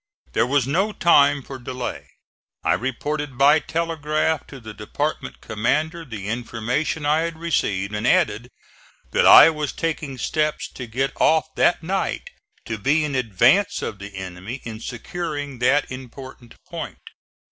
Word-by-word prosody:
There 120 Hz, -, +2 dB
was 140 Hz, -1 st, +2 dB
no 185 Hz, +10 st, +1 dB
time 145 Hz, -6 st, +4 dB
for 135 Hz, 0 st, -9 dB
delay; 125 Hz, 0 st, -5 dB, 0.6 s
I -, -, +3 dB
reported 135 Hz, +2 st, -3 dB
by 145 Hz, +4 st, +6 dB
telegraph 160 Hz, -2 st, -1 dB
to 135 Hz, -, -10 dB
the 110 Hz, -2 st, -9 dB
department 145 Hz, +9 st, -4 dB
commander 150 Hz, +10 st, -1 dB
the 105 Hz, -7 st, -7 dB
information 120 Hz, +6 st, -2 dB
I 150 Hz, +2 st, +3 dB
had 165 Hz, 0 st, -3 dB
received, 105 Hz, -, -1 dB
and 105 Hz, +3 st, -1 dB
added 125 Hz, -, +2 dB, 0.6 s
that -, -, +3 dB
I 165 Hz, -, +10 dB
was 150 Hz, -2 st, -3 dB
taking 150 Hz, -4 st, -3 dB
steps 155 Hz, +3 st, -1 dB
to 125 Hz, -, -8 dB
get 130 Hz, +5 st, -1 dB
off 160 Hz, 0 st, +3 dB
that 175 Hz, -, +2 dB
night 195 Hz, -, -2 dB, 0.3 s
to 110 Hz, -2 st, -4 dB
be 150 Hz, +8 st, +2 dB
in 145 Hz, -, -4 dB
advance 130 Hz, -, +2 dB
of 100 Hz, -, -5 dB
the 100 Hz, 0 st, -9 dB
enemy 95 Hz, +7 st, -7 dB
in 110 Hz, -2 st, -7 dB
securing 145 Hz, +2 st, -5 dB
that 130 Hz, +4 st, +2 dB
important 130 Hz, -1 st, -10 dB
point. -, -, -8 dB
140 Hz, 145 wpm, -22 LUFS, 120-155 Hz, 0.6 s, I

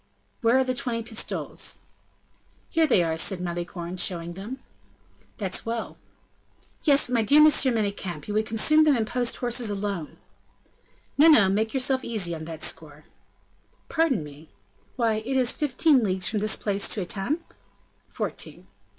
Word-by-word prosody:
"Where 230 Hz, +2 st, +4 dB
are 265 Hz, -, +4 dB
the 255 Hz, 0 st, -1 dB
twenty 245 Hz, -3 st, -3 dB
pistoles?" 225 Hz, -1 st, -3 dB, 0.9 s
"Here 325 Hz, -2 st, +3 dB
they 195 Hz, -10 st, +4 dB
are," 160 Hz, -1 st, -1 dB
said 190 Hz, +2 st, 0 dB
Malicorne, 175 Hz, 0 st, -5 dB
showing 175 Hz, -1 st, 0 dB
them. 205 Hz, +8 st, -7 dB, 0.8 s
"That's 195 Hz, -4 st, -3 dB
well." 230 Hz, 0 st, -4 dB, 0.9 s
"Yes, 285 Hz, -3 st, +4 dB
but 250 Hz, -, -5 dB
my 235 Hz, -, +3 dB
dear 280 Hz, +8 st, +5 dB
M. 305 Hz, -, +9 dB
Manicamp, 205 Hz, -, +1 dB
you 210 Hz, -, -3 dB
would 215 Hz, +1 st, 0 dB
consume 305 Hz, +8 st, +3 dB
them 295 Hz, -4 st, +4 dB
in 225 Hz, -, 0 dB
post 245 Hz, +1 st, -2 dB
horses 240 Hz, -2 st, -1 dB
alone!" 200 Hz, -5 st, -4 dB, 1.0 s
"No, 310 Hz, -, +8 dB
no, 225 Hz, -12 st, +7 dB
make 215 Hz, +3 st, 0 dB
yourself 265 Hz, 0 st, +1 dB
easy 200 Hz, -7 st, -1 dB
on 160 Hz, -1 st, -6 dB
that 160 Hz, -1 st, -7 dB
score." 150 Hz, -1 st, -6 dB, 0.9 s
"Pardon 300 Hz, -, +1 dB
me. 150 Hz, +2 st, -12 dB, 0.5 s
Why, 225 Hz, -3 st, +1 dB
it 265 Hz, +3 st, -1 dB
is 250 Hz, -2 st, +3 dB
fifteen 290 Hz, -2 st, +2 dB
leagues 185 Hz, -3 st, 0 dB
from 215 Hz, -, -1 dB
this 215 Hz, +1 st, +1 dB
place 200 Hz, -1 st, -1 dB
to 210 Hz, -, -2 dB
Etampes?" 205 Hz, -, -2 dB, 0.7 s
"Fourteen." -, -, -4 dB
220 Hz, 155 wpm, -26 LUFS, 185-255 Hz, 1.0 s, M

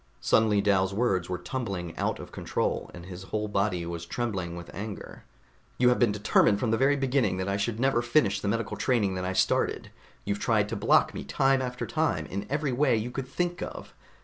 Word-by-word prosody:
Suddenly 110 Hz, -2 st, +3 dB
Dal's 100 Hz, -1 st, +2 dB
words 95 Hz, -6 st, +1 dB
were 90 Hz, -, -1 dB
tumbling 90 Hz, -3 st, -4 dB
out -, -, -1 dB
of -, -, -10 dB
control, -, -, -2 dB
and 85 Hz, 0 st, -10 dB
his 90 Hz, -1 st, -8 dB
whole 105 Hz, +2 st, -2 dB
body 100 Hz, -4 st, 0 dB
was 85 Hz, -1 st, -5 dB
trembling 95 Hz, -4 st, -3 dB
with 85 Hz, 0 st, -9 dB
anger. 105 Hz, +1 st, -7 dB, 0.5 s
"You 125 Hz, 0 st, +5 dB
have 125 Hz, -, +2 dB
been 120 Hz, -4 st, +4 dB
determined 105 Hz, 0 st, +3 dB
from 115 Hz, -1 st, 0 dB
the -, -, +4 dB
very 140 Hz, +2 st, +4 dB
beginning 135 Hz, -7 st, +1 dB
that 95 Hz, 0 st, -2 dB
I 100 Hz, 0 st, 0 dB
should 110 Hz, +2 st, -2 dB
never 135 Hz, -2 st, +2 dB
finish 120 Hz, -4 st, +2 dB
the -, -, -3 dB
medical 115 Hz, +3 st, -1 dB
training 110 Hz, -7 st, +1 dB
that 90 Hz, 0 st, -3 dB
I 95 Hz, -, -1 dB
started. -, -, +1 dB, 0.3 s
You've 100 Hz, 0 st, -1 dB
tried 105 Hz, -3 st, +1 dB
to -, -, -3 dB
block -, -, +3 dB
me -, -, -5 dB
time 135 Hz, 0 st, +2 dB
after 125 Hz, -1 st, -3 dB
time, 155 Hz, -, 0 dB
in 100 Hz, +5 st, -5 dB
every 145 Hz, 0 st, 0 dB
way 125 Hz, -1 st, +3 dB
you 115 Hz, +3 st, -3 dB
could 130 Hz, 0 st, -4 dB
think 175 Hz, +5 st, -2 dB
of. -, -, -7 dB
105 Hz, 210 wpm, -28 LUFS, 95-125 Hz, 0.5 s, You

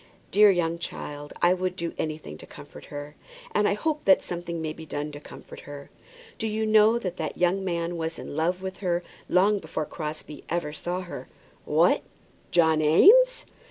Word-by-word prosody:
Dear 210 Hz, +1 st, +7 dB
young 170 Hz, -3 st, +1 dB
child, 145 Hz, -2 st, -6 dB
I 175 Hz, +1 st, +6 dB
would 185 Hz, 0 st, -2 dB
do 170 Hz, -2 st, -4 dB
anything 155 Hz, -, -4 dB
to -, -, -11 dB
comfort 75 Hz, -, -12 dB
her! 145 Hz, 0 st, -8 dB, 0.4 s
And 210 Hz, -, +2 dB
I -, -, +2 dB
hope 300 Hz, +7 st, -2 dB
that 190 Hz, -, +5 dB
something 170 Hz, -1 st, -5 dB
may 155 Hz, -1 st, -3 dB
be 160 Hz, -, -10 dB
done 150 Hz, -1 st, -4 dB
to 145 Hz, -, -8 dB
comfort -, -, -12 dB
her. 145 Hz, -1 st, -10 dB, 0.5 s
Do 225 Hz, -, -1 dB
you 220 Hz, +1 st, -1 dB
know 215 Hz, +1 st, +5 dB
that 185 Hz, -6 st, -4 dB
that 155 Hz, -, -4 dB
young 180 Hz, +2 st, +1 dB
man 170 Hz, -1 st, -2 dB
was 165 Hz, 0 st, -3 dB
in -, -, -7 dB
love 175 Hz, +4 st, 0 dB
with 190 Hz, 0 st, -5 dB
her 175 Hz, -2 st, -1 dB, 0.3 s
long 200 Hz, +3 st, +4 dB
before 160 Hz, -2 st, -4 dB
Crosbie 155 Hz, -1 st, -7 dB
ever 170 Hz, -3 st, -2 dB
saw 175 Hz, +4 st, -3 dB
her?" 180 Hz, -, -8 dB, 0.4 s
"What; -, -, +3 dB, 0.5 s
John 160 Hz, -2 st, +3 dB
Eames!" 480 Hz, -, +6 dB
175 Hz, 185 wpm, -26 LUFS, 155-190 Hz, 0.5 s, Dear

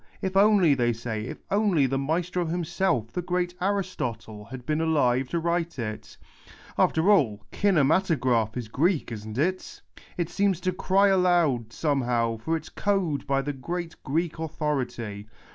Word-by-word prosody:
If 190 Hz, 0 st, -3 dB
only, 195 Hz, -6 st, +5 dB
they 120 Hz, -3 st, +1 dB
say, 110 Hz, -2 st, -4 dB
if -, -, -8 dB
only 200 Hz, -8 st, +3 dB
the 135 Hz, +1 st, 0 dB
maestro 170 Hz, +4 st, -1 dB
himself, 170 Hz, -, -1 dB
the 180 Hz, -, -1 dB
great 175 Hz, 0 st, -1 dB
Aristotle, 125 Hz, -, -3 dB
had 125 Hz, +3 st, -9 dB
been 155 Hz, +3 st, 0 dB
alive 135 Hz, -5 st, +2 dB
to 170 Hz, -, -1 dB
write 170 Hz, 0 st, -1 dB
it! 110 Hz, -3 st, -6 dB, 0.6 s
After 165 Hz, +6 st, +3 dB
all, 115 Hz, -, +2 dB
kinematograph 145 Hz, -, +2 dB
is 120 Hz, -3 st, -4 dB
Greek, 155 Hz, -, 0 dB
isn't 110 Hz, 0 st, -6 dB
it? 185 Hz, +6 st, -2 dB, 0.3 s
It 175 Hz, -2 st, -2 dB
seems 200 Hz, -4 st, +1 dB
to 185 Hz, -, 0 dB
cry 195 Hz, +2 st, +3 dB
aloud, 175 Hz, -, +2 dB
somehow, 120 Hz, -6 st, 0 dB
for 160 Hz, +9 st, -1 dB
its 160 Hz, 0 st, -10 dB
code 190 Hz, -9 st, -1 dB
by 135 Hz, 0 st, +1 dB
the 145 Hz, +1 st, -3 dB
great 170 Hz, +5 st, -5 dB
Greek 160 Hz, +4 st, -1 dB
authority. 130 Hz, -10 st, -3 dB
155 Hz, 150 wpm, -26 LUFS, 125-180 Hz, 0.6 s, only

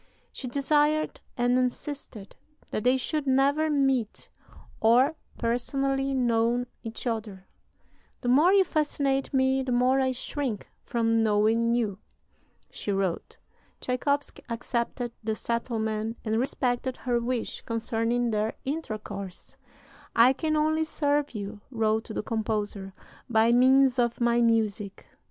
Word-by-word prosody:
She 260 Hz, -, -7 dB
desired 295 Hz, +4 st, +1 dB, 0.2 s
and 245 Hz, +1 st, +3 dB
insisted 250 Hz, -4 st, -4 dB, 0.4 s
that 215 Hz, -, -2 dB
they 255 Hz, +1 st, +4 dB
should 290 Hz, +2 st, -2 dB
never 280 Hz, +4 st, +3 dB
meet 270 Hz, -6 st, 0 dB, 0.5 s
or 245 Hz, +7 st, +4 dB, 0.2 s
personally 270 Hz, +3 st, 0 dB
know 240 Hz, -1 st, +1 dB, 0.2 s
each 225 Hz, +2 st, -7 dB
other; 215 Hz, -5 st, -4 dB, 0.8 s
"the 245 Hz, -, -4 dB
more 295 Hz, +9 st, +5 dB
you 395 Hz, -1 st, +6 dB
fascinate 280 Hz, -5 st, 0 dB
me, 265 Hz, 0 st, +2 dB
the 260 Hz, -1 st, -3 dB
more 250 Hz, +2 st, +3 dB
I 260 Hz, -1 st, +2 dB
shrink 255 Hz, -3 st, -3 dB, 0.2 s
from 225 Hz, -1 st, +1 dB
knowing 225 Hz, +2 st, +2 dB
you," 210 Hz, -5 st, -1 dB, 0.7 s
she 205 Hz, -, -4 dB
wrote. 195 Hz, -3 st, -2 dB, 0.4 s
Tschaikowsky 280 Hz, +3 st, -1 dB
accepted 235 Hz, +1 st, -2 dB
the 220 Hz, 0 st, -1 dB
settlement, 225 Hz, -1 st, -2 dB
and 220 Hz, +1 st, +1 dB
respected 255 Hz, 0 st, -1 dB
her 245 Hz, -1 st, 0 dB
wish 235 Hz, 0 st, -2 dB
concerning 230 Hz, +1 st, -1 dB
their 215 Hz, +1 st, 0 dB
intercourse. 215 Hz, -, -5 dB, 0.6 s
"I 240 Hz, +3 st, +6 dB
can 310 Hz, +3 st, -1 dB
only 310 Hz, +1 st, +2 dB
serve 290 Hz, -3 st, 0 dB
you," 205 Hz, 0 st, -6 dB
wrote 220 Hz, -2 st, 0 dB
the 215 Hz, -, -4 dB
composer, 210 Hz, -3 st, -3 dB, 0.4 s
"by 225 Hz, 0 st, +4 dB
means 260 Hz, +1 st, +5 dB
of 235 Hz, -1 st, +1 dB
my 240 Hz, 0 st, +3 dB
music. 215 Hz, -4 st, 0 dB
240 Hz, 125 wpm, -27 LUFS, 225-270 Hz, 0.8 s, you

